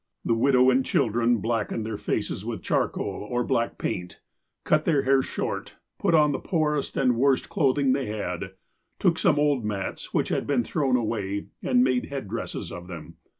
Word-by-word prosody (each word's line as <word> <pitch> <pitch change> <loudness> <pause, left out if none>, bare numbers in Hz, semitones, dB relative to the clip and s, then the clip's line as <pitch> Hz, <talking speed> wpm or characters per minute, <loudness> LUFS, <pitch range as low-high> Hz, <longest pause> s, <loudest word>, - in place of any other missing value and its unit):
The - - +2
widow 130 +2 +4
and 130 +1 +3
children 120 0 +2
blackened 115 0 -1
their 110 -1 -3
faces - - -2
with - - -5
charcoal - - -1
or 120 +4 -1
black 115 -2 0
paint, 90 0 -4 0.4
cut 155 0 +2
their 150 -5 +2
hair 135 0 +4
short, - - -4 0.2
put 170 - +3
on 150 -2 +5
the 135 - -2
poorest 150 -4 -1
and 125 -3 +3
worst 135 +1 +2
clothing 140 -6 +2
they 135 -2 -1
had, 100 -3 -4 0.4
took - - +2
some - - +3
old 145 -4 +2
mats 105 -2 -4
which - - 0
had - - -1
been 135 -4 +2
thrown 135 +1 0
away, 105 -4 -2
and 125 -1 +3
made 130 -1 +1
head 135 -6 -5
dresses 115 +4 -5
of 90 +1 -8
them. 85 -3 -9
125 Hz, 180 wpm, -26 LUFS, 110-140 Hz, 0.4 s, on